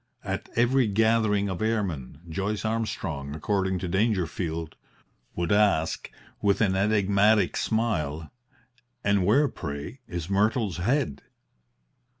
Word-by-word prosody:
At - - -4
every 120 +1 +3
gathering 110 -1 +2
of 95 -1 -4
airmen, 95 - -2
Joyce 100 +5 -2
Armstrong, 95 -10 -3
according 95 +3 0
to 90 - -4
Dangerfield, 85 -5 -1 0.6
would 85 -1 -1
ask, 100 -6 +2 0.3
with 100 -1 +2
an 100 -4 +2
enigmatic 100 0 +3
smile: 80 -10 -1 0.7
"And 100 -3 +2
where, 140 +8 +4
pray, 75 - -6
is 85 -2 -5
Myrtle's 105 0 +1
head?" 90 - 0
100 Hz, 110 wpm, -26 LUFS, 85-110 Hz, 0.7 s, where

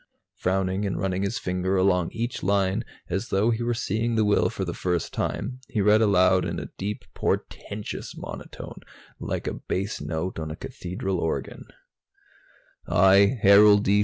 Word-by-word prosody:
Frowning 95 +1 0
and 100 -4 -1
running 95 0 -1
his 100 +5 -1
finger 95 -4 -1
along 90 -2 +2
each 115 +2 -3
line, 95 0 +1 0.2
as 95 +7 -3
though 105 +4 +2
he 115 0 -1
were 120 0 0
seeing 115 +2 -1
the 110 -1 +3
will 105 - +3
for 100 -4 -4
the 85 - -3
first 90 -1 -2
time, 125 +4 -3
he 110 - -2
read 105 +2 +5
aloud 95 -3 +4
in - - -3
a - - -7
deep 105 +2 -4
portentous 105 0 -4
monotone, - - -8 0.4
like - - -3
a - - -2
bass 100 0 -3
note 80 +4 -3
on 80 -1 -4
a 75 - -5
cathedral 90 +2 -4
organ. 80 -1 -3 1.2
"I, 100 +6 +5
Harold 100 +1 +7
D. 100 0 +3
95 Hz, 160 wpm, -25 LUFS, 90-105 Hz, 1.2 s, Harold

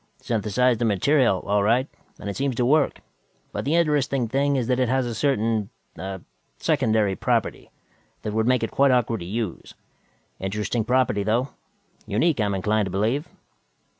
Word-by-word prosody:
"Synthesized 115 +2 +1
the 120 - +1
material, 115 0 +2
all 105 0 +2
right, 120 +6 +2 0.3
and - - -7
it 100 - -3
seems 135 -2 -1
to 120 - +1
work, 145 +2 +2 0.5
but - - -4
the 150 +4 +1
interesting 145 -6 +1
thing 140 +4 +1
is 130 -3 0
that 125 +1 0
it 125 -2 +1
has 130 0 +1
a 120 - -3
certain 115 -6 0 0.3
ah 95 0 -5 0.4
secondary 110 -3 +1
property - - -1 0.5
that 105 -1 -3
would 110 +1 +1
make 125 -2 +2
it 115 - -2
quite 140 0 +3
awkward 120 -3 +2
to 85 - -7
use. 110 -1 -4 0.6
Interesting 105 +4 -2
property, 125 -3 +1
though. 115 +6 0 0.6
Unique, 135 +7 +1
I 105 - +2
am 100 -1 -1
inclined 105 +2 0
to - - -6
believe." 115 - 0
115 Hz, 170 wpm, -24 LUFS, 105-130 Hz, 0.6 s, quite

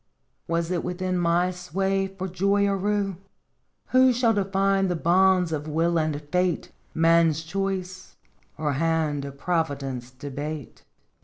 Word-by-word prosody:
Was 170 +1 -1
it 175 -2 -1
within 185 +1 -2
my 175 +1 +2
sway 195 +2 -1
for 190 0 -6
joy 200 +3 +1
or 200 0 +1
rue? 200 -1 -1 0.7
Who 255 0 +5
shall 235 -1 +2
define 195 -1 +1
the 175 - 0
bounds 180 +1 +3
of 155 -1 -3
will 165 +2 +1
and 155 -2 -1
fate, 180 -2 0 0.2
Man's 165 -1 +3
choice, 185 +1 -4 0.4
or 150 -2 -1
hand 155 -1 0
of 140 0 -8
Providence 140 -7 -2
debate? 145 +2 -7
175 Hz, 135 wpm, -25 LUFS, 155-195 Hz, 0.7 s, Who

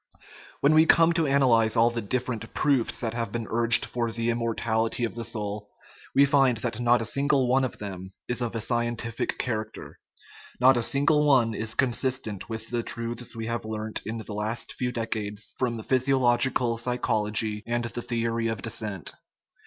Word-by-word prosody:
When 145 +2 +4
we 160 +1 +5
come 165 0 +5
to 165 -2 +1
analyze 125 -5 +3
all 115 +1 +4
the 120 0 -3
different 120 +1 -3
proofs 125 -7 +1
that 115 -2 -2
have 115 -1 -3
been 115 -1 -3
urged 115 0 +5
for 120 -2 -2
the 115 +1 -1
immortality 115 0 -1
of 115 - -1
the 115 - -5
soul, 105 -2 -5 0.5
we 140 - +7
find 135 -4 +3
that 115 +1 -3
not 120 -1 +3
a - - -5
single 140 +2 +1
one 130 +2 +3
of 130 - -3
them 95 -2 -7 0.2
is 125 0 -1
of 120 -1 -3
a 115 - -2
scientific 120 0 -2
character; 110 -3 -5 0.6
not 130 +2 +6
a 120 - +1
single 150 +4 +2
one 120 -5 +4
is 110 +1 -3
consistent 125 -5 -1
with 110 0 -6
the 120 -1 0
truths 115 +1 -3
we 115 -1 -5
have 115 0 -3
learned 110 0 -4
in 110 +3 -5
the 110 -1 -7
last 105 +3 -3
few 125 -1 -2
decades 110 -3 -4
from 120 -3 -1
physiological 130 -2 +2
psy 125 +1 -2
chology 105 -2 0
and 120 0 -1
the 120 +1 -5
theory 115 -1 -1
of 115 -3 -4
descent. 105 - -3
115 Hz, 180 wpm, -26 LUFS, 110-125 Hz, 0.6 s, we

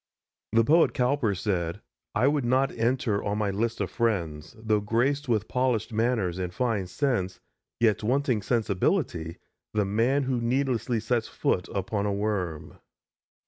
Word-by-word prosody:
The 115 0 +5
poet 160 +8 +4
Cowper 125 -4 +1
said: 90 -2 -2 0.4
"I 130 - +3
would 145 -1 +2
not 130 +3 +2
enter 115 -3 0
on 105 0 -1
my 105 -2 0
list 115 +4 -1
of - - -2
friends, 85 -10 -1
Though 110 -1 +1
graced 125 +7 0
with 110 -3 +1
polished 125 -3 0
manners 110 -6 0
and 90 -1 -2
fine 110 -2 -1
sense, 95 -5 -1 0.4
Yet 110 -3 +3
wanting 125 0 +1
sensibility, 95 -7 0 0.4
the 105 -1 +2
man 115 +8 +2
Who 130 -2 -1
needlessly 125 -1 0
sets 115 0 0
foot 90 - -1
upon 100 +1 -2
a 100 - 0
worm." 100 -6 -3
110 Hz, 145 wpm, -27 LUFS, 100-125 Hz, 0.4 s, The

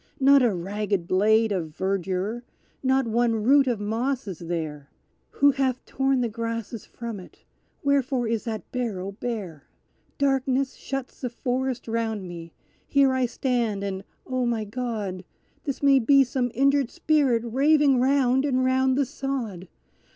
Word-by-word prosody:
Not 275 +1 +6
a 240 -3 +3
ragged 195 0 -2
blade 220 +4 +3
of 165 -6 -3
verdure 195 +3 -1 0.4
not 265 0 +2
one 230 0 +1
root 275 +3 +5
of 240 -4 0
moss 235 +5 -2
is 185 -5 -6
there; 160 -4 -5 0.4
Who 285 0 +4
hath 265 -2 -1
torn 270 -1 +1
the 240 - +1
grasses 230 0 -5
from 230 -3 -6
it 180 - -15 0.4
wherefore 275 -3 +1
is 225 -1 -1
that 220 -2 -5
barrow 205 -7 -3
bare? 200 - -6 0.5
Darkness 270 -1 +1
shuts 270 -2 -6
the 250 - -2
forest 255 +1 -2
round 225 -3 -2
me. 170 -1 -8 0.4
Here 275 -2 +4
I 260 -1 +1
stand 235 -5 -1
and, 195 -1 -4 0.2
O 255 -1 -1
my 230 -2 0
God! 210 -5 -4 0.4
This 275 -1 -4
may 275 -1 +6
be 275 +3 +5
some 250 -1 -1
injured 275 0 +3
spirit 290 -8 +2
raving 275 +2 +3
round 265 0 +3
and 260 -3 +1
round 260 0 +2
the 280 - +2
sod. 235 -10 -4
240 Hz, 150 wpm, -25 LUFS, 205-265 Hz, 0.5 s, Not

